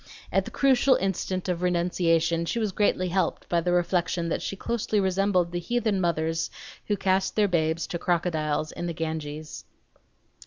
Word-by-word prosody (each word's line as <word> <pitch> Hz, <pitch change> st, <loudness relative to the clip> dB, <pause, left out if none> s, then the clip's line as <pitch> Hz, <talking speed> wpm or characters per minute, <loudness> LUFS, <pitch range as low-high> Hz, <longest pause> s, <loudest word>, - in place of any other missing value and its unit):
At -, -, +2 dB
the -, -, -6 dB
crucial 270 Hz, -1 st, +4 dB
instant 190 Hz, -1 st, -2 dB
of 180 Hz, -1 st, -1 dB
renunciation 170 Hz, -2 st, +1 dB
she 235 Hz, -, -2 dB
was 215 Hz, -3 st, 0 dB
greatly 185 Hz, -2 st, +1 dB
helped 185 Hz, +2 st, -1 dB
by 170 Hz, -1 st, +1 dB
the 175 Hz, +1 st, 0 dB
reflection 175 Hz, -1 st, +1 dB
that -, -, -1 dB
she -, -, -3 dB
closely 220 Hz, 0 st, -1 dB
resembled 190 Hz, -2 st, +1 dB
the 175 Hz, -, -2 dB
heathen 220 Hz, 0 st, 0 dB
mothers 165 Hz, -1 st, 0 dB, 0.4 s
who 205 Hz, -, +1 dB
cast 190 Hz, 0 st, +1 dB
their 210 Hz, -1 st, +4 dB
babes 160 Hz, -2 st, 0 dB
to 175 Hz, -3 st, -4 dB
the -, -, -17 dB
crocodiles 155 Hz, -3 st, 0 dB
in 175 Hz, -, -5 dB
the 170 Hz, -, -2 dB
Ganges. 155 Hz, -2 st, -5 dB
175 Hz, 170 wpm, -26 LUFS, 165-195 Hz, 0.4 s, crucial